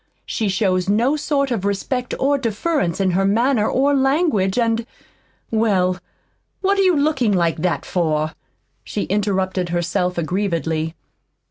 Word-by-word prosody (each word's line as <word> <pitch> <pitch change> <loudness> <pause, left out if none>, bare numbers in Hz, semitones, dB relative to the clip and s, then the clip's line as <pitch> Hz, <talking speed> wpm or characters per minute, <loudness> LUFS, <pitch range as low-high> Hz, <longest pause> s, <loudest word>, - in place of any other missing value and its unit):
She 220 -4 -1
shows 190 -1 +1
no 235 +8 +2
sort 280 -2 0
of 220 -6 -1
respect 235 +5 -2
or 280 +1 +2
deference 230 - -1
in 190 -1 +2
her 190 +2 +1
manner 220 +3 +2
or 280 +2 +2
language, 270 - +2
and 230 -1 +1 0.6
well, 190 -5 +1 0.6
what 395 +1 +2
are - - +5
you 370 -3 +4
looking 280 -7 +2
like 170 -3 +1
that 175 +2 -1
for?" 155 -3 0 0.5
she 205 - -3
interrupted 190 -3 -1
herself 175 +1 -1
aggrievedly. 165 -2 -1
200 Hz, 135 wpm, -20 LUFS, 180-260 Hz, 0.6 s, are